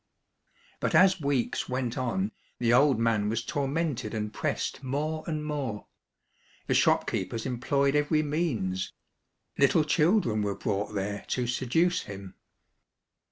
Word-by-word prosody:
But - - 0
as 190 -1 +5
weeks 140 -4 -1
went 125 -2 -2
on 165 - -1 0.3
the 120 -1 +2
old 135 +1 +5
man 110 -3 +1
was 115 +1 -2
tor 140 +2 -1
mented 140 -7 -2
and 105 0 -3
pressed - - -2
more 150 +4 -2
and 155 -2 -2
more. 135 -8 -3 0.8
The - - 0
shop - - +4
keepers 105 +5 -3
employed 140 +3 +1
every 150 +1 +2
means. 120 - -1 0.7
Little 140 +3 +5
children 150 - +2
were 100 -1 -1
brought 105 +1 -2
there 100 +1 -3
to 125 - -1
seduce 130 +8 +1
him. 100 -2 -9
130 Hz, 135 wpm, -28 LUFS, 110-150 Hz, 0.8 s, as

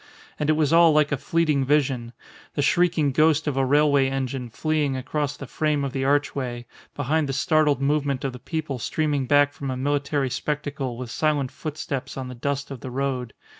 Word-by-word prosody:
And 150 - 0
it - - +5
was 155 -1 +1
all 170 -1 +7
like 150 -1 +3
a - - +2
fleeting 155 -1 +1
vision, 130 -4 +1 0.4
the 145 - +1
shrieking 165 -2 +2
ghost 155 +2 +3
of 145 -3 -1
a 135 - +2
railway 140 0 +3
engine 135 -2 -3
fleeing 150 +1 0
across 145 +2 -2
the 135 - -7
frame 150 +2 0
of 140 - -3
the 135 - -1
archway, 135 -3 0 0.3
behind 145 +1 0
the - - -1
startled 150 0 +2
movement 140 -2 0
of 135 -2 -2
the 125 - -9
people 145 -1 -4
streaming 145 +1 -1
back 145 +1 +4
from 140 -1 -5
a 130 - -2
military 140 0 0
spectacle 145 -4 -3
with 125 -1 -6
silent 145 -3 0
footsteps 145 -4 -5
on 130 -1 -5
the - - -6
dust 140 +3 -3
of 135 - -6
the 130 - -7
road. 130 -2 -3
140 Hz, 195 wpm, -24 LUFS, 130-150 Hz, 0.4 s, all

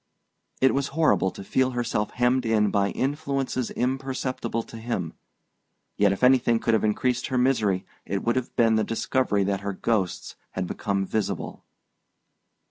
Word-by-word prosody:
It 130 - +5
was 140 0 0
horrible 155 -11 +3
to 100 - -9
feel 130 +5 +1
herself 115 -3 -1
hemmed 125 +1 +2
in 110 -3 +2
by 100 0 +2
influences 135 -2 -2
imperceptible 130 -2 -2
to 115 - -11
him; 110 -8 -3 0.8
yet 100 -1 +3
if 100 - -3
anything 125 -2 +5
could 115 - 0
have 110 - +2
increased 120 +4 0
her 130 - -1
misery 110 -7 +2 0.2
it 100 - -3
would 120 - +1
have 130 -2 -3
been 115 -2 +4
the 110 - +2
discovery 115 -2 0
that 100 0 -1
her 100 0 -3
ghosts 95 -2 -1 0.2
had 95 - -2
become 100 +1 -2
visible. 110 +2 -3
115 Hz, 155 wpm, -25 LUFS, 100-130 Hz, 0.8 s, It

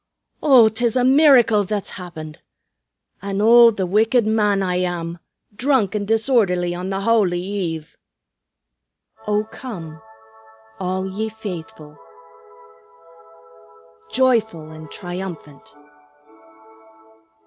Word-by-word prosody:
Oh, 260 -7 +6
'tis 225 +2 -1
a 250 - +2
miracle 255 -6 +5
that's 205 0 -4
happened! 160 -4 -9 0.8
An' 195 0 -4
oh! 235 +2 +7
The 200 -4 -2
wicked 220 +5 +2
man 210 -2 +1
I 180 -1 -1
am, 175 -2 -3 0.4
drunk 245 -4 +1
and 205 -1 -3
disorderly 215 -6 +1
on 180 +2 -5
the 195 0 -3
Howly 200 -5 +2
Eve!" 175 -5 -5 1.3
"O 210 0 +1
come, 180 - -9 0.8
all 185 +1 -3
ye 215 +4 -4
faithful, 180 -8 -9 2.1
Joyful 220 -11 0
and 155 -1 -11
triumphant!" 175 -5 -8
200 Hz, 95 wpm, -20 LUFS, 175-225 Hz, 2.1 s, oh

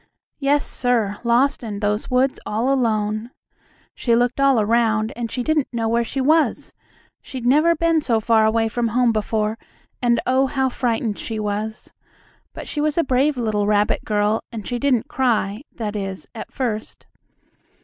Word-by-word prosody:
Yes, 285 0 +2
sir, 230 -5 0
lost 245 +4 +2
in 210 -4 -5
those 210 +1 -1
woods 260 +1 +1
all 230 +6 0
alone. 215 -3 0 0.6
She 235 -2 +1
looked 245 +2 +1
all 275 -3 +4
around, 220 +1 +1
and 235 -1 -4
she 250 - -2
didn't 305 0 +1
know 230 -2 -1
where 235 +1 +2
she 260 +4 -4
was. 310 +4 +1 0.5
She'd 255 -3 -7
never 305 +7 +4
been 330 0 +2
so 235 -6 +1
far 220 0 +3
away 225 +1 +2
from 235 +1 -1
home 240 +1 +2
before, 215 0 -1 0.4
and, 240 -1 +3
oh, 260 +1 +2
now 265 0 +2
frightened 230 -4 -1
she 225 -2 -4
was! 210 +1 -4 0.6
But - - -9
she 295 - -3
was 300 +1 0
a 335 - +4
brave 270 +2 +1
little 215 -3 0
rabbit 210 0 +1
girl, 210 +1 +1
and 225 -3 -7
she 245 -1 -2
didn't 255 -4 +1
cry, 225 -5 0
that 215 -3 -4
is, 195 -2 -5
at 225 - -8
first. 225 -5 -4
235 Hz, 170 wpm, -21 LUFS, 215-260 Hz, 0.6 s, all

